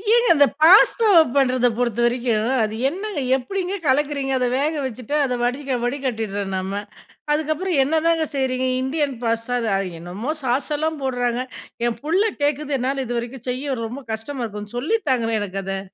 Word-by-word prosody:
ஏங்க 475 0 +3
இந்த 285 0 +6 0.2
பாஸ்தாவ 400 +4 +6 0.2
பண்றத 255 -2 +3
பொறுத்தவரைக்கும், 240 -1 +1
அது 215 0 -2
என்னங்க 385 -2 -4 0.2
எப்பிடிங்க 375 +7 -3
கலக்குறீங்க? 280 0 +1
அத 250 - +1
வேக 300 +3 +1
வச்சுட்டு 255 +3 -4
அத 255 -2 0
வடி 250 +4 0 0.2
வடிக்கட்டிர்றோம் 220 -7 -2
நம்ம. 190 +1 -3 0.6
அதுக்கப்பறம் 310 +2 0
என்னதாங்க 320 +2 +2
செய்றீங்க? 260 -1 0
இந்தியன் 280 0 -1
பாஸ்தா 230 +1 -1
அது 225 - -2
அ - - 0 0.2
என்னமோ! 185 - -6
சாஸ் 255 +4 0
எல்லாம் 315 0 -2
போட்றாங்க. 245 -1 0 0.5
என் 235 - -3
புள்ள 335 +6 +2 0.2
கேட்குது 290 0 0
என்னால 265 +1 -1
இதுவரைக்கும் 240 +1 -5
செய்ய 265 +2 -2
ரொம்ப 255 +5 -7
கஷ்டமா 245 +3 -4
இருக்கு. 210 +1 -8
சொல்லி 325 - +1
தாங்களேன்! 230 -3 +1
எனக்கு 195 -1 -4
அத. 195 0 -3
260 Hz, 150 wpm, -22 LUFS, 235-295 Hz, 0.6 s, இந்த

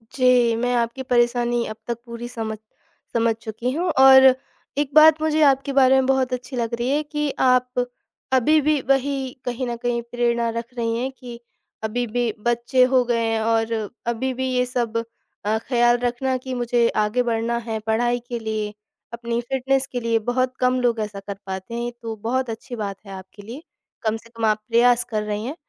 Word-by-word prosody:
जी, 250 -3 +4
मैं 245 +2 0
आपकी 235 +2 -1
परेशानी 240 -1 +1
अब 215 - -6
तक 235 -1 -2
पूरी 235 0 -7
समझ 220 -3 -5 0.6
समझ 230 -1 +2
चुकी 230 +3 -3
हूँ। 345 +6 -1
और 265 0 +9 0.5
एक 290 -1 -1
बात 310 0 +7
मुझे 315 0 +1
आपके 275 0 +3
बारे 265 -1 +5
में 265 0 +3
बहुत 260 -1 +1
अच्छी 250 +2 -5
लग 235 -1 -2
रही 240 +2 -1
है 295 +2 +1
कि 295 0 -2
आप 250 -1 +2 0.5
अभी 285 +5 +4
भी 300 0 +2
वही 270 -1 +1
कहीं 245 +1 -3
न 240 - -2
कहीं 240 -1 0
प्रेरणा 235 0 0
रख 235 +2 -6
रही 230 -1 -1
हैं 255 +3 -2
कि 240 -2 -9 0.4
अभी 240 +3 -1
भी 240 +1 -1
बच्चे 240 +2 +2
हो 255 -1 +5
गए 235 -1 0
हैं 225 0 0
और 225 0 +1 0.4
अभी 250 +3 -1
भी 260 +1 -2
ये 250 0 +2
सब 240 -2 -2 0.5
अ, 215 +1 +1
ख्याल 240 -1 +3
रखना 245 +2 -1
कि 255 +1 -6
मुझे 240 -1 +1 0.2
आगे 225 +4 0
बढ़ना 235 0 -1
है 220 -1 -2
पढ़ाई 240 +2 +1
के 240 -1 -3
लिए, 215 -2 -3 0.4
अपनी 235 0 -3
फ़िटनेस 265 +2 0
के 245 - -2
लिए। 230 -1 +1
बहुत 255 +3 -1
कम 255 0 +2
लोग 235 -2 +1
ऐसा 210 -2 -4
कर 195 0 -7
पाते 190 +3 -6
हैं, 240 +1 -3
तो 225 -1 -5
बहुत 255 +2 -1
अच्छी 225 +2 -6
बात 205 -3 -4
है 195 - -10
आपके 190 +2 -11
लिए, 240 +9 -9 0.4
कम 220 0 0
से 230 +1 -17
कम 230 -1 -3
आप 215 0 +2
प्रयास 240 +1 +4
कर 215 -3 -1
रही 210 +1 -3
हैं। 275 +5 -4
240 Hz, 195 wpm, -22 LUFS, 230-255 Hz, 0.6 s, और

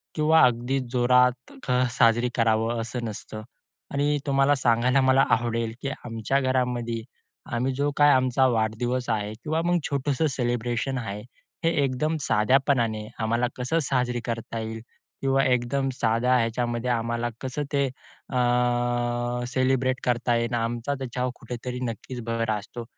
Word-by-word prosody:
किंवा 160 +1 +4
अगदी 125 +2 0
जोरात 125 - +3
क - - 0 0.3
साजरी 120 0 +4
करावं 115 0 +1
असं 120 +1 -5
नसतं. 110 0 -7 0.5
आणि 145 +1 +1
तुम्हाला 135 +1 +3
सांगायला 125 +1 +3
मला 130 +1 +4
आवडेल 115 -1 -2
की 135 - -2 0.2
आमच्या 115 +3 -1
घरामध्ये 125 -3 -1 0.5
आम्ही 130 +3 0
जो 145 +2 0
काय 145 0 +6
आमचा 130 0 +3
वाढदिवस 120 +2 -1
आहे 105 -1 -1
किंवा 160 +2 0
मग 175 0 +3
छोटंसं 140 +2 0
सेलिब्रेशन 120 +1 -1
आहे, 105 -2 -5 0.4
हे - - +5
एकदम 145 +4 0
साध्यापणाने 115 -2 +2
आम्हाला 115 +2 +1
कसं 130 +6 0
साजरी 125 -2 0
करता 115 -1 -4
येईल? 110 0 -5 0.4
किंवा 135 0 +2
एकदम 130 +2 +1
साध्या 120 +1 +2
ह्याच्यामध्ये 120 +1 -1
आम्हाला 115 0 -1
कसं 130 +3 -3
ते 140 -1 +3 0.4
अ, - - -5 1.1
सेलिब्रेट 130 0 +1
करता 120 0 +1
येणार? 115 0 0
आमचा 120 +4 -2
त्याच्यावर 125 -1 -2
कुठेतरी 125 +1 -6
नक्कीचं 120 +1 -5
भर 115 -1 -1
असतो. 110 +3 -5
125 Hz, 135 wpm, -25 LUFS, 115-130 Hz, 1.1 s, काय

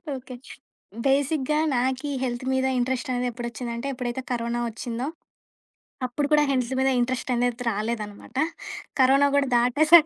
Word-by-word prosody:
Okay. 255 -1 -8 0.7
బేసిక్‌గా 285 +2 +2 0.2
నాకి 260 +3 0
health 245 0 -2
మీద 260 0 +2
ఇంట్రెస్టనేది 250 0 0
ఎప్పుడొచ్చిందంటే, 235 +1 -4
ఎప్పుడైతే 250 0 -3
కరోనా 235 0 -1
వచ్చిందో, 235 +3 -4 1.0
అప్పుడు 285 +4 -1
కూడా 300 0 +6
హెల్త్ 255 -1 0
మీద 265 0 +3
ఇంట్రెస్టనేది 245 -1 0
రాలేదనమాట. 210 +1 -4 0.7
కరోనా 275 +2 +6
కూడా 280 - +3
దాటేసాక 305 +7 +6
250 Hz, 115 wpm, -25 LUFS, 240-270 Hz, 1.0 s, కూడా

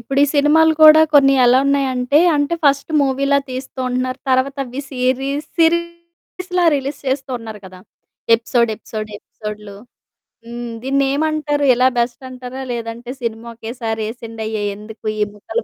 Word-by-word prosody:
ఇప్పుడు 270 +4 -3
ఈ - - +5
సినిమాలు 315 +3 +4
కూడా 310 0 +9
కొన్ని 275 -1 +6
ఎలా 245 +1 +5
ఉన్నాయంటే 275 -1 +1 0.2
అంటే 290 +3 0
ఫస్ట్ 280 +2 +2
మూవీలా 275 +1 +1
తీస్తూ 260 +1 -7
ఉంటున్నారు. 255 +1 -2
తర్వాత 260 +2 +1
అవి 250 +2 -6
సీరీ 255 +1 -1 0.3
సిరిస్‌లా 340 +2 -1
రిలీజ్ 280 +1 -3
చేస్తూ 265 0 -2
ఉన్నారు 220 -2 -9
కదా! 185 0 -13 0.6
ఎపిసోడ్, 235 0 0
ఎపిసోడ్, 215 -1 -7
ఎపిసోడ్లు. 210 -1 -9 0.7
హ్మ్. 235 0 -6
దీన్నేమంటారు? 290 +2 0
ఇలా 255 +1 +4
బెస్ట్ 240 +2 -1
అంటారా? 255 +1 -8
లేదంటే 235 +1 -6
సినిమా 230 0 -4
ఒకేసారి 225 -1 -4
ఏసిండయ్య! 220 -3 -5
ఎందుకు? 215 +2 -12
ఈ - - 0
ముక్కలు, 225 +3 -4
255 Hz, 135 wpm, -18 LUFS, 230-280 Hz, 0.7 s, కూడా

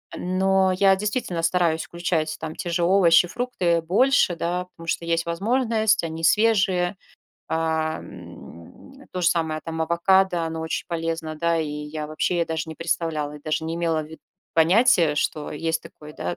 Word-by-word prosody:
Но 190 +1 +1
я 195 +1 +4
действительно 200 -3 -2
стараюсь 165 -2 +1
включать, 165 -2 -2
там, 160 0 -6
те 175 - -5
же 170 0 0
овощи, 175 -1 +5
фрукты, 245 -1 -4
э, 170 -1 +3
больше, 190 +3 +3
да, 180 +2 -2
потому 165 -2 -14
что 170 - -1
есть 165 0 0
возможность, 220 +4 +1
они 165 0 -6
свежие. 195 -4 +3 0.5
А, 160 -1 -1
м, 270 - -13
то 185 - -3
же - - +2
самое, 160 -3 -1
там, 160 -1 -3
авокадо, 175 +1 +2
оно 160 0 -4
очень 160 0 -3
полезно, 165 -2 -3
да, 170 +2 0
и 155 -2 -2
я 150 +1 -5
вообще 170 +3 0
даже 160 -1 -4
не 160 - -8
представляла, 160 -3 -2
и - - -13
даже 155 +1 -2
не 165 +1 -3
имела 165 -2 0
в - - -10
ви 160 +1 -12 0.4
понятия, 170 -2 +4
что 150 0 -2
есть 165 +2 -2
такое, 150 0 -13
да. 90 -9 -4
170 Hz, 170 wpm, -23 LUFS, 160-185 Hz, 0.5 s, овощи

